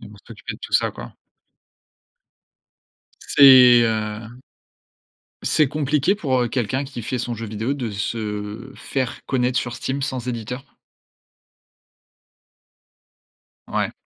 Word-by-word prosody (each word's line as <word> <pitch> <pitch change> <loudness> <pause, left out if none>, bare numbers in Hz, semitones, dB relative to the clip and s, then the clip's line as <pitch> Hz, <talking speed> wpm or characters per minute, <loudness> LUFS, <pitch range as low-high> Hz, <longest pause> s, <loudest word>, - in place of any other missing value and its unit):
ils - - -11
vont 105 - -14
s'occuper - - -8
de - - -13
tout - - -9
ça - - +3
quoi. - - -10 2.1
C'est 130 -3 +7
heu 110 +1 -3 1.0
c'est 155 - +3
compliqué 150 +4 +1
pour, 135 -10 0
heu, 120 - -1
quelqu'un 130 +3 -1
qui 135 -3 -8
fait 125 +4 -3
son 120 0 -3
jeu 115 0 -6
vidéo 110 +6 -2
de 125 -5 -4
se 105 +2 -4
faire 130 -3 -4
connaître 125 -1 +1
sur 120 0 -3
Steam, 135 +2 -3
sans 130 -3 -3
éditeur? 125 +3 -6 2.9
Ouais. - - -1
125 Hz, 120 wpm, -22 LUFS, 110-135 Hz, 2.9 s, C'est